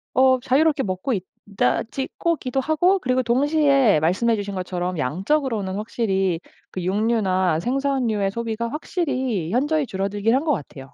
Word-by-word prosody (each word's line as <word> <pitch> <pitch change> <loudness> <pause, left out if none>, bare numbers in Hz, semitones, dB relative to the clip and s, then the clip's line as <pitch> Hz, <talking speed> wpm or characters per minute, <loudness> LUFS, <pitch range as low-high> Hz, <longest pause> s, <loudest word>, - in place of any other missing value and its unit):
어 260 0 +5
자유롭게 285 +3 +2
먹고 185 +3 -2 0.4
있다지 230 +6 -1
고 335 0 +1
기도 260 -1 -2
하고 315 +7 +2
그리고 255 -4 +1
동시에 275 - +3
말씀해 190 +9 +2
주신 200 -1 -4
것처럼 180 -1 -3
양적으로는 195 - -1
확실히 195 -5 -1 0.3
그 185 - -5
육류나 190 -4 +1
생선류의 245 -3 0
소비가 230 +1 -3
확실히 260 - -2
현저히 290 +6 +1
줄어들긴 205 +1 -1
한 270 +3 +2
것 320 - +1
같아요. 135 - -8
230 Hz, 345 characters per minute, -22 LUFS, 190-270 Hz, 0.4 s, 어